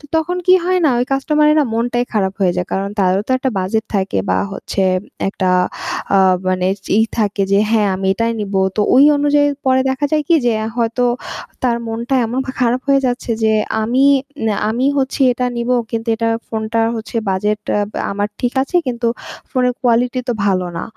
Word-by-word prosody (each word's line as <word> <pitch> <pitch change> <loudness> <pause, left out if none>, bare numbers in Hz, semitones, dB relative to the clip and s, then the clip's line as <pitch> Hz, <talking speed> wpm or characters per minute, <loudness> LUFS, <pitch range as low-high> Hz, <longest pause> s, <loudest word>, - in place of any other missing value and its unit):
তো - - -21
তখন 320 +3 -1
কি 365 - +7
হয় 365 0 +2
না? - - +5
ওই 245 - +1
কাস্টমারের 300 +2 +2
না 290 - +2
মনটাই 240 +1 0
খারাপ 195 -4 0
হয়ে 185 -2 +3
যায়। 180 - -1
কারণ 195 +1 -1
তারও 190 0 +2
তো - - -7
একটা 260 0 -1
বাজেট 210 +4 -1
থাকে 190 - 0
বা 95 - +2
হচ্ছে - - -4 0.5
একটা 190 -1 -3 0.7
আ - - +5 0.3
মানে 185 0 0 0.3
ই - - +5 0.2
থাকে 205 -2 0
যে, 200 - +5
"হ্যাঁ, 215 -3 +3
আমি 190 0 -3
এটাই 230 +2 0
নেবো।" 195 -2 -1 0.2
তো - - +1
ওই 265 +2 +7
অনুযায়ী 290 0 +3 0.2
পরে 260 0 +4
দেখা 265 +2 -2
যায় 305 -1 +2
কি 340 - +5
যে 240 - +3 0.2
হয়তো 235 +1 0 0.6
তার 245 -2 +2
মনটা 230 +3 -3
এমন 240 +3 -3
পা - - -3
খারাপ 245 +1 +2
হয়ে 275 0 +4
যাচ্ছে 245 -1 -3
যে 220 - +3 0.3
আমি 245 +5 +1 0.4
নে 220 - +2 0.2
আমি 235 +4 -1
হচ্ছি 270 +1 -2
এটা 250 +1 -2
নিবো। 235 +1 0 0.2
কিন্তু 230 0 -4
এটা 230 0 0 0.2
ফোনটা 220 0 -2 0.2
হচ্ছে 225 +1 -6
বাজেট 210 +3 0
অ্যা 205 - +1 0.3
আমার 205 +1 -1
ঠিক 245 -1 0
আছে, 275 +7 -2
কিন্তু 240 -1 -2 0.4
ফোনের 250 -2 +1
কোয়ালিটি 245 0 +1
তো - - +2
ভালো 185 -2 +1
না। 170 - -3
235 Hz, 195 wpm, -17 LUFS, 205-260 Hz, 0.7 s, কি